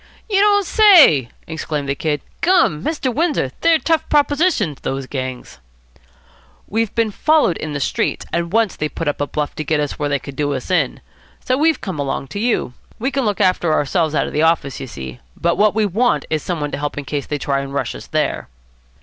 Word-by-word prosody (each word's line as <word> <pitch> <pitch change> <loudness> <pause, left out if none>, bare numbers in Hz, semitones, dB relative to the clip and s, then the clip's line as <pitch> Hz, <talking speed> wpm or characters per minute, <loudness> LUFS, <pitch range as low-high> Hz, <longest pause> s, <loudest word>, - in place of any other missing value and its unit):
"You 400 -3 +2
don't 405 -1 +4
say!" 335 - +6 0.2
exclaimed 155 -3 -4
the 140 - +1
Kid. 150 0 -2 0.2
"Gum! 340 - +3
Mr. 285 -5 -1
Windsor, 300 - 0
they're 330 -1 +5
tough 325 0 0
propositions, 290 - +2
those 135 0 -3
gangs." 130 - -6 1.1
"We've 225 0 -1
been 230 -2 +1
followed 300 - +2
in 155 -1 -5
the 145 - -2
streets, - - -1
and 170 0 -1
once 225 -2 +2
they 150 - -2
put 165 - -5
up 145 - -1
a 145 - 0
bluff 150 0 -3
to 155 - -2
get 155 0 0
us 145 -1 -3
where 145 -1 -1
they 145 - +1
could 140 +1 -10
do 145 0 -1
us 130 - -5
in. 180 - +1 0.4
So 255 - +2
we've 315 +3 +2
come 185 -7 -5
along 135 -1 -3
to 200 - -5
you. 225 - 0 0.2
We 260 +5 -2
can 270 -2 -1
look 205 -3 -1
after 180 -3 +2
ourselves 155 +1 +1
out - - +2
of - - -6
the 150 - +1
office, 160 -4 +1
you 135 - -6
see, 65 - -8 0.2
but 170 0 +1
what 210 0 +4
we 220 -1 +2
want 220 +6 +1
is 155 -1 0
some 175 +1 -3
one 145 -1 -3
to - - -4
help 145 0 -3
in 145 - -4
case 145 +1 -3
they 150 - -2
try 140 0 -1
to 140 - -5
rush 140 +1 -3
us - - -10
there." - - -1
160 Hz, 220 wpm, -19 LUFS, -, 1.1 s, say